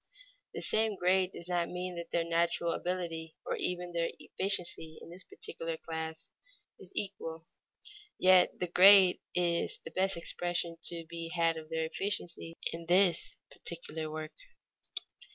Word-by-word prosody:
The - - -3
same 220 -1 +2
grade 185 0 +2
does 170 - -8
not 175 -1 0
mean 180 0 -4
that 170 -1 -6
their 170 - +1
natural 170 0 +1
ability 170 -3 -3
or - - -1
even 180 -1 -2
their 170 -1 +1
efficiency 175 -4 -2
in - - -12
this 180 +2 -6
particular 165 0 -5
class, 160 -1 -5 0.5
is 185 - -12
equal. 165 -4 -3 0.7
Yet 185 -1 +6
the 180 - -1
grade 185 +1 +8 0.2
is 170 -1 +2
the - - -7
best 190 -1 +1
expression 170 0 -2
to 170 -1 -1
be 165 0 -6
had 165 -1 +2
of 160 -1 -8
their 160 0 -1
efficiency 170 -2 -3 0.2
in 165 0 -7
the 180 -1 +6 0.4
particular 160 -2 -5
work. 155 0 -6
170 Hz, 145 wpm, -32 LUFS, 165-180 Hz, 0.7 s, grade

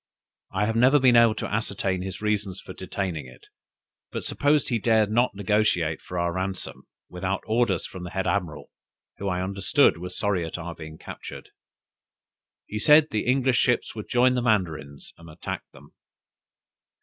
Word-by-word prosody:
I 100 +2 0
have 110 +1 -1
never 130 +5 +5
been 130 -3 +5
able 115 -2 +6
to - - -3
ascertain 100 -3 -1
his 95 +2 -6
reasons 105 -3 -1
for 95 - -10
detaining 90 -6 -4
it, 65 - -16 0.6
but - - -5
suppose 145 +1 +2
he 120 -3 +1
dared 110 -1 +3
not 120 -1 +2
negociate 100 -5 +1
for 90 - -7
our 85 0 0
ransom 95 +1 -5 0.2
without 95 +2 -3
orders 110 -5 +1
from 95 - -8
the 90 - -6
head 95 +1 -2
admiral, 80 -8 -2 0.5
who 100 - -3
I 90 -1 -1
understood 95 -2 +2
was 90 +1 -7
sorry 100 -4 0
at 80 - -5
our 85 0 -6
being 80 -1 -10
captured. - - -9 1.2
He 105 - -5
said 150 +6 +6
the 110 - -1
English 130 0 +3
ships 125 -2 +1
would 110 -2 -8
join 125 +1 +4
the 125 - 0
Mandarins 80 - -1
and 85 0 -13
attack 75 - -6
them." - - -17
100 Hz, 170 wpm, -25 LUFS, 90-115 Hz, 1.2 s, able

